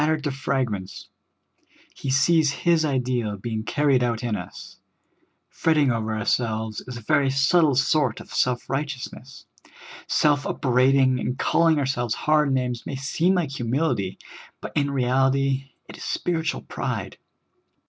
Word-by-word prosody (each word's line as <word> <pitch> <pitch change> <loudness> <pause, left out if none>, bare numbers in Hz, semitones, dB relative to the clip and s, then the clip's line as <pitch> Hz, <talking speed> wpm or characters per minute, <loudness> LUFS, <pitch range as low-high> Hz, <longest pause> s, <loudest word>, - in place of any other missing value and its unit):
tered 155 0 +1
to 145 - -1
fragments, 130 -8 -3 0.8
He 135 - -6
sees 150 +3 +3
His 165 +3 +1
ideal 125 -7 -1
being 110 +2 -4
carried 140 +2 +1
out 120 -1 -1
in 115 -3 -1
us. - - -9 0.8
P'retting 150 -5 +2
over 110 -1 -2
ourselves 110 0 -1
is 125 -1 -6
a - - -8
very 140 +4 +2
subtle 140 +2 +3
sort 135 -2 +2
of - - -12
vSelf 125 -2 0
righteousness. 135 -2 -5 0.6
Self 145 -1 +2
upbraiding 130 0 +3
and 125 +1 -3
calling 165 +1 +3
our 145 - +1
selves 120 -3 -1
hard 150 -2 +2
names 125 -2 -1
may 140 - -5
seem 160 +7 +1
like 170 -6 -1
humility, 120 - -1 0.4
but - - -7
in 145 -2 +1
reality 135 +1 +1 0.2
it - - -11
is - - -9
spiritual 165 -1 -2
pride. - - -4
135 Hz, 140 wpm, -24 LUFS, 120-150 Hz, 0.8 s, sees